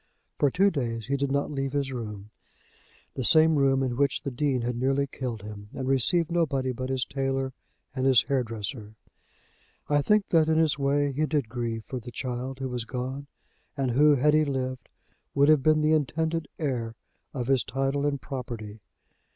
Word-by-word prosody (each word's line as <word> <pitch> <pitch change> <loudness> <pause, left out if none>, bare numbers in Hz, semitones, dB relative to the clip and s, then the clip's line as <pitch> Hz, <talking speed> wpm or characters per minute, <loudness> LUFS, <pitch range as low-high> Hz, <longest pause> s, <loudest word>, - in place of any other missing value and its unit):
For 145 - +4
two 195 +6 +3
days 115 - -3
he 140 +4 -1
did 140 0 -1
not 140 +1 0
leave 135 -1 -3
his 140 -2 -1
room, 105 -4 -6 0.8
the 130 - -3
same 160 +5 +5
room 135 -1 +3
in 125 -2 -1
which 140 -1 +1
the 140 - -3
Dean 130 0 0
had 120 +1 -2
nearly 135 +3 +1
killed 125 -6 -5
him, 105 -1 -9
and 130 -1 -4
received 150 +6 +3
nobody 140 -6 +1
but 130 +1 -5
his 130 -1 0
tailor 135 -1 -2 0.4
and 130 0 +1
his 130 -5 +6
hair 135 -2 +1
dresser. 110 -1 -5 0.9
I 145 0 +3
think 210 +6 +2
that, 160 -2 +4
in 160 - +3
his 155 -2 +2
way, 140 +1 +1
he 155 +3 0
did 145 -6 -1
grieve 115 -2 -3
for 130 - -5
the 120 - -9
child 125 +2 -4
who 135 -1 -4
was 125 -2 -3
gone, 130 +4 -5 0.5
and 135 -2 0
who, 145 +4 +5
had 150 +3 +3
he 155 0 +5
lived, 130 -3 -3 0.5
would 140 +1 +5
have 155 -3 +5
been 155 +2 +3
the 155 +1 +3
intended 160 +2 0
heir 120 -7 -2 0.4
of 125 -4 -3
his 130 -2 +2
title 135 +2 -1
and 140 -1 -1
property. 120 -6 -6
135 Hz, 190 wpm, -27 LUFS, 125-145 Hz, 0.9 s, his